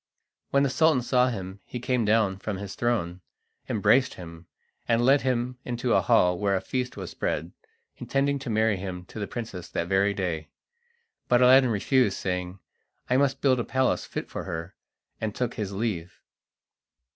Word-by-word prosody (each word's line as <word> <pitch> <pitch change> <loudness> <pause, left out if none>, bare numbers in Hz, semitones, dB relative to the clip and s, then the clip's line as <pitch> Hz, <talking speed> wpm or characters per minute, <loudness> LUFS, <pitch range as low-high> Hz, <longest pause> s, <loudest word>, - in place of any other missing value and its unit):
When 140 0 +3
the 140 - +2
Sultan 155 -4 +3
saw 125 +1 +3
him 95 -5 -5
he 125 - -7
came 125 -1 0
down 105 -3 +2
from 100 -1 -4
his 100 0 -6
throne, 95 -7 -1 0.5
embraced 125 +5 +3
him, 85 -1 -11 0.4
and 120 0 +2
led 135 +2 +5
him 125 -1 -1
into 120 0 -1
a 95 - +4
hall 90 0 +3
where 100 -1 +1
a - - +1
feast 125 +4 -3
was 95 -3 -6
spread, 80 +4 -2 0.5
intending 140 +1 0
to 135 -2 -6
marry 110 -1 +2
him 90 -1 -6
to 110 - -9
the 100 - -3
princess 100 -7 -6
that 85 - -2
very 100 +1 +2
day. 85 -5 -3 0.8
But 125 0 +4
Aladdin 130 0 +7
refused, 115 0 +2
saying, 90 0 -3 0.5
"I 125 - +4
must 135 -1 +1
build 130 -3 +3
a - - 0
palace 130 +1 0
fit - - -5
for - - -6
her," 85 +2 -5 0.5
and 110 -1 -2
took 125 -1 -1
his 105 -3 -4
leave. 100 -4 -3
110 Hz, 175 wpm, -26 LUFS, 95-125 Hz, 0.8 s, Aladdin